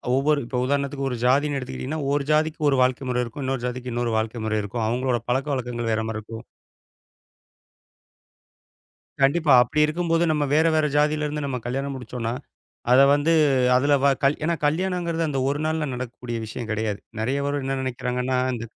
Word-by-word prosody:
ஒவ்வொரு 145 +2 +2
இப்போ 125 +1 -4
உதாரணத்துக்கு 140 0 -1
ஒரு 125 - -3
ஜாதின்னு 140 +3 +2
எடுத்துக்கிட்டீங்கன்னா, 135 +4 -5
ஒரு 145 0 +1
ஜாதிக்கு 155 +1 +1
ஒரு 140 - +2
வாழ்க்கை 130 +1 -1
முறை 125 0 +1
இருக்கும். 120 +4 -7
இன்னொரு 130 -2 -2
ஜாதிக்கு 125 0 -4
இன்னொரு 120 -1 -1
வாழ்க்கை 110 +1 -2
முறை 110 0 0
இருக்கும். 110 +3 -3
அவங்களோட 125 +1 0
பழக்கவழக்கங்கள் 125 -3 -1
வேற 110 0 0
மாரி 110 - -3
இருக்கும். 110 +1 -9 2.8
கண்டிப்பா. 145 +2 +4
அப்படி 135 +5 -1
இருக்கும்போது 165 +1 0
நம்ம 150 -1 +1
வேற 160 +2 +4
வேற 155 -1 +3
ஜாதியிலிருந்து 150 0 0
நம்ம 130 -2 -2
கல்யாணம் 135 +3 -3
முடிச்சோம்ன்னா, 120 -2 -4 0.6
அத 130 - +7
வந்து 145 +3 +2 0.4
அதுல 145 +3 +3
வ - - +6 0.2
கல் 140 +2 +3
ஏன்னா 170 +2 +1
கல்யாணம்ங்கறது 170 0 -1
அந்த 135 -2 -2
ஒரு 140 +1 -1
நாள்ல 160 -1 -1
நடக்கக்கூடிய 125 -1 -5
விஷயம் 110 +1 -6
கெடையாது. 110 -1 -2 0.2
நெறைய 130 +6 0
பேரு 145 0 -1
என்ன 135 0 -1
நெனைக்கிறாங்கன்னா, 125 0 -2 0.2
இந்த 115 -1 -5
135 Hz, 165 wpm, -24 LUFS, 125-150 Hz, 2.8 s, அத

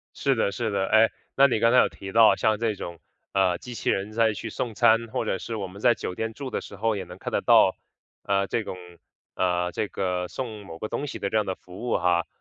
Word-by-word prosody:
是 135 -2 +1
的， 100 -3 0
是 115 +1 -2
的， 95 -1 0
诶， 110 +1 +5 0.3
那 140 +1 +7
你 120 -5 0
刚 115 +1 +4
才 125 - +6
有 - - +5
提 95 0 -9
到 115 -1 +6
像 110 -1 +1
这 115 -2 0
种， 85 -3 -7 0.3
呃， 95 -2 +2
机 125 - -9
器 - - -4
人 100 +2 0
在 110 -1 +2
去 115 +2 -6
送 115 +1 -4
餐， 115 +3 +4
或 - - -2
者 95 - -1
是 115 +4 -5
我 100 - -3
们 95 +2 -11
在 120 0 +5
酒 90 - -5
店 115 +2 -4
住 140 -2 -6
的 - - -2
时 100 - -11
候， 110 +1 0
也 95 - -4
能 90 0 -11
看 - - -6
得 - - +1
到， - - +5 0.5
呃， 100 0 +1
这 115 - -1
种 95 - -6 0.6
呃， 90 -1 0
这 105 - -2
个 90 -2 -2
送 110 -5 -6
某 80 -3 -9
个 110 - -4
东 145 - -3
西 - - -6
的 100 - -3
这 110 - 0
样 105 - 0
的 95 - -2
服 95 +7 -9
务 - - +2
哈。 85 -1 +1
105 Hz, 280 characters per minute, -25 LUFS, 95-115 Hz, 0.6 s, 那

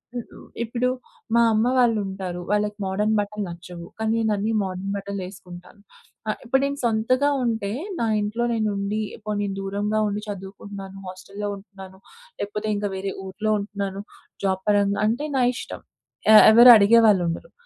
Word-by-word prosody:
హు 245 - -1
హు - - -14 0.3
ఇప్పుడు 240 +2 -1 0.5
మా 235 - +5
అమ్మ 215 +2 +2
వాళ్ళుంటారు. 195 -6 0
వాళ్ళకి 210 0 0
మోడర్న్ 210 +3 0
బట్టలు 205 0 -3
నచ్చవు, 170 0 -9
కానీ 220 0 0
నేనన్నీ 215 -1 0
మోడర్న్ 190 +1 -4
బట్టలేసుకుంటాను. 185 -1 -8 0.5
ఆహ్, 215 - -1
ఇప్పుడు 265 +3 +2
నేను 280 0 -3
సొంతగా 235 +5 +2
ఉంటే 225 -4 -1 0.3
నా 235 - +1 0.2
ఇంట్లో 215 +3 -1
నేను 215 -2 0
ఉండి, 200 +2 -2 0.2
పోనీ 205 -1 -1
దూరంగా 205 +2 -1
ఉండి 205 0 -3
చదువుకుంటున్నాను, 195 0 -8
హాస్టల్లో 195 +3 -6
ఉంటున్నాను, 195 -1 -13 0.4
లేకపోతే 210 +1 -4
ఇంకా 205 0 -2
వేరే 195 +1 -3
ఊర్లో 210 +3 -2
ఉంటున్నాను 200 -1 -5 0.4
జాబ్ 190 0 0
పరంగా 200 -1 +2
అంటే 245 +8 -1
నా 255 - +3
ఇష్టం. - - -7 0.5
ఆహ్, 215 - +10
ఎవరు 240 +2 +10
అడిగేవాళ్ళుండరు. 200 -5 +3
205 Hz, 145 wpm, -23 LUFS, 195-220 Hz, 0.5 s, ఆహ్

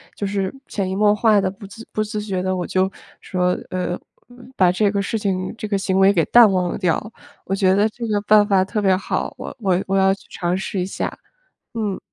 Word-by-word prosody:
就 205 - -3
是 195 -1 -2
潜 195 -3 -2
移 190 - -2
默 205 +1 +4
化 215 -1 +4
地 190 -1 0
不 195 +1 -12
自 225 +3 -12
不 215 - -1
自 215 0 -4
觉 195 -3 -3
地 185 0 -1
我 180 -1 -3
就 190 +1 0 0.3
说， 180 -1 0 0.2
呃， 180 -1 -3 0.6
把 180 -2 +4
这 205 +3 +2
个 200 0 -1
事 220 +3 -2
情 185 -2 -2
这 215 - -5
个 205 -1 0
行 190 -1 0
为 195 +1 +6
给 170 -5 +2
淡 235 -4 +7
忘 180 -2 0
掉， 185 +4 -1 0.3
我 195 - -1
觉 190 -1 +3
得 205 +2 +3
这 230 +2 -6
个 210 -2 +1
办 210 0 +5
法 190 -2 +3
特 210 +2 -2
别 190 -2 +3
好， - - -3
我 - - -7
我 190 -5 +1
我 195 - 0
要 195 0 +4
去 195 - -12
尝 175 0 -2
试 190 0 -3
一 180 - 0
下， 190 - -4 0.6
嗯。 210 -4 -2
195 Hz, 245 characters per minute, -21 LUFS, 185-210 Hz, 0.6 s, 淡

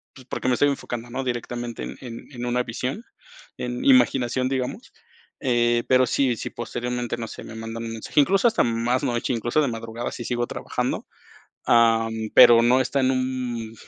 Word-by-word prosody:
pues, 130 - -14
porque - - -3
me 125 - +3
estoy 145 - +3
enfocando, 120 -4 -5
¿no? 135 +2 -3
Directamente 120 -1 -4
en - - -7
en 120 +1 -9
en 125 -1 -6
una 125 +1 +1
visión, 130 - -4 0.5
en 125 0 -4
imaginación, 130 0 +3
digamos, 130 -2 -3 0.5
eh, 120 -2 +2
pero 130 0 +5
si 130 0 +1
si - - -5
posteriormente, 120 +1 -4
no 115 -1 -5
sé, - - -9
me - - -10
mandan 115 +1 -6
un 115 - -5
mensaje, 115 +6 -1
incluso 195 - +3
hasta 225 -1 +2
más 120 +2 0
noche, 120 -1 -1
incluso 120 +6 0
de 145 - +1
madrugada 115 0 -5
si 120 - -6
sigo 120 -1 -1
trabajando, - - -3 0.6
am, 115 -1 +4 0.2
pero 115 -1 +9
no 125 +2 +4
está 135 +2 0
en 130 0 +3
un 125 -3 -3
120 Hz, 180 wpm, -24 LUFS, 115-130 Hz, 0.6 s, pero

